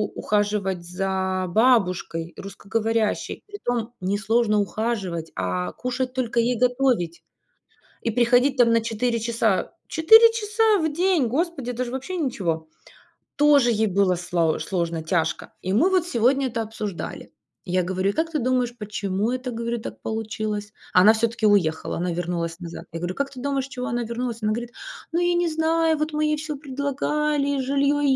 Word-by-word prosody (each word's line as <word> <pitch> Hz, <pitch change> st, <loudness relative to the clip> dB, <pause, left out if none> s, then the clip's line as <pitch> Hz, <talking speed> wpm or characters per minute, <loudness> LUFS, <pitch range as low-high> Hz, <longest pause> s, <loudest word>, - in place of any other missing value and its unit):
ухаживать 205 Hz, -3 st, 0 dB
за 190 Hz, +1 st, -2 dB
бабушкой 185 Hz, -6 st, +2 dB
русскоговорящей. 215 Hz, +3 st, -2 dB
При 415 Hz, 0 st, -10 dB
том 240 Hz, -1 st, -2 dB
несложно 210 Hz, +3 st, +1 dB
ухаживать, 200 Hz, -6 st, -2 dB
а, 90 Hz, 0 st, -2 dB
кушать 250 Hz, 0 st, -3 dB
только 240 Hz, -2 st, -1 dB
ей 240 Hz, +1 st, +1 dB
готовить 245 Hz, -8 st, +1 dB, 0.8 s
и 230 Hz, -, 0 dB
приходить 245 Hz, +4 st, +3 dB
там 240 Hz, -2 st, +5 dB
на 230 Hz, -, +4 dB
4 230 Hz, +1 st, -1 dB
часа. 225 Hz, -3 st, 0 dB, 0.2 s
4 445 Hz, +8 st, +7 dB
часа 440 Hz, -1 st, +2 dB
в 315 Hz, -1 st, 0 dB
день, 345 Hz, -3 st, +2 dB
Господи, 280 Hz, 0 st, -2 dB
это 250 Hz, +1 st, -2 dB
же 240 Hz, -, -6 dB
вообще 265 Hz, +8 st, -4 dB
ничего. 170 Hz, -, -2 dB, 0.7 s
Тоже 290 Hz, -4 st, +5 dB
ей 220 Hz, -1 st, +2 dB
было 195 Hz, -2 st, +2 dB
сла 175 Hz, -2 st, 0 dB
сложно, 170 Hz, -3 st, -2 dB
тяжко. 165 Hz, 0 st, -1 dB
И 185 Hz, -, -2 dB
мы 280 Hz, -, +4 dB
вот 370 Hz, -2 st, +2 dB
сегодня 265 Hz, -2 st, +2 dB
это 230 Hz, -1 st, -2 dB
обсуждали. 210 Hz, -6 st, -6 dB, 0.4 s
Я 185 Hz, +1 st, +2 dB
говорю: 185 Hz, +2 st, 0 dB
"И -, -, -2 dB
как 325 Hz, +1 st, 0 dB
ты 310 Hz, -, -1 dB
думаешь, 250 Hz, -2 st, 0 dB
почему 210 Hz, 0 st, -2 dB
это, 255 Hz, 0 st, -3 dB
говорю, 235 Hz, 0 st, -3 dB
так 220 Hz, -, -8 dB
получилось?" 215 Hz, -1 st, -4 dB, 0.2 s
Она 185 Hz, +4 st, +8 dB
всё-таки 225 Hz, 0 st, -1 dB
уехала, 175 Hz, -7 st, +2 dB
она 175 Hz, +1 st, -1 dB
вернулась 170 Hz, -1 st, -3 dB
назад. 170 Hz, -1 st, -8 dB
Я 165 Hz, -, -4 dB
говорю: 175 Hz, +2 st, -3 dB
"Как 280 Hz, +4 st, -1 dB
ты 255 Hz, -, -10 dB
думаешь, 275 Hz, -2 st, -1 dB
чего 250 Hz, -1 st, -5 dB
она 240 Hz, 0 st, -1 dB
вернулась?" 235 Hz, 0 st, -3 dB
Она 215 Hz, -, +1 dB
говорит: 240 Hz, +2 st, -4 dB, 0.4 s
"Ну, 340 Hz, -, +1 dB
я 350 Hz, 0 st, +2 dB
не 345 Hz, 0 st, +2 dB
знаю, 320 Hz, 0 st, +1 dB
вот 305 Hz, 0 st, -2 dB
мы 305 Hz, 0 st, +1 dB
ей 305 Hz, 0 st, +2 dB
всё 305 Hz, -1 st, -4 dB
предлагали, 285 Hz, +1 st, -1 dB
и -, -, 0 dB
жилье 280 Hz, +2 st, +1 dB
230 Hz, 165 wpm, -24 LUFS, 195-275 Hz, 0.8 s, Она